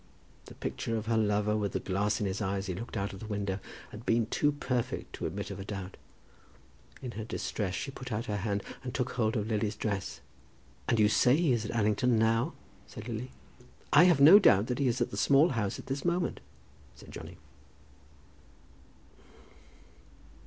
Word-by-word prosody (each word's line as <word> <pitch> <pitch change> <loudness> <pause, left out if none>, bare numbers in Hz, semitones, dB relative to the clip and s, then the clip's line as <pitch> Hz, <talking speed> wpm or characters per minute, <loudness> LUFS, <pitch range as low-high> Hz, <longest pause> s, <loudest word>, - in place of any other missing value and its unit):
The - - -12
picture 115 - -3
of 110 - -4
her 115 0 +1
lover, 105 -1 +2
with 105 -2 -1
the - - 0
glass 100 +2 0
in 105 - -1
his 95 +2 -2
eye 100 -1 -1
as 95 - -4
he 95 - -3
looked 115 +5 -6
out 100 0 -2
of 95 - -9
the 110 - -8
window, 100 -2 -2 0.3
had 110 - -9
been 115 -1 +2
too 145 +6 +1
perfect 125 -4 -3
to - - -3
admit 100 0 -5
of 100 - -7
a - - -5
doubt. 95 -2 -6 1.1
In 125 - -4
her 110 -1 -6
distress 100 -3 -3
she 135 - -4
put 130 -1 -8
out 110 +2 -2
her 105 -3 -2
hand 100 0 -2 0.2
and 125 0 -5
took 125 -1 -1
hold 110 -2 0
of 105 - -1
Lily's 105 -1 -1
dress. 95 - -3 0.7
"And 115 - +2
you 105 - +6
say 125 +4 +4
he 160 -3 +2
is 115 -3 +1
at 110 - -4
Allington 110 +2 +2
now?" 115 +1 +2 0.3
said - - -9
Lily. 120 +2 -4 0.6
"I 150 +5 +8
have 175 -5 +5
no 160 +9 +10
doubt 115 - +4
he 140 0 +1
is 125 +1 0
at 120 - 0
the 100 - -5
Small 140 - +5
House 105 -6 -1
at - - -10
this 135 +1 -3
moment," 175 0 0 0.6
said 65 - -14
Johnny. - - -9
110 Hz, 195 wpm, -30 LUFS, 100-125 Hz, 1.1 s, no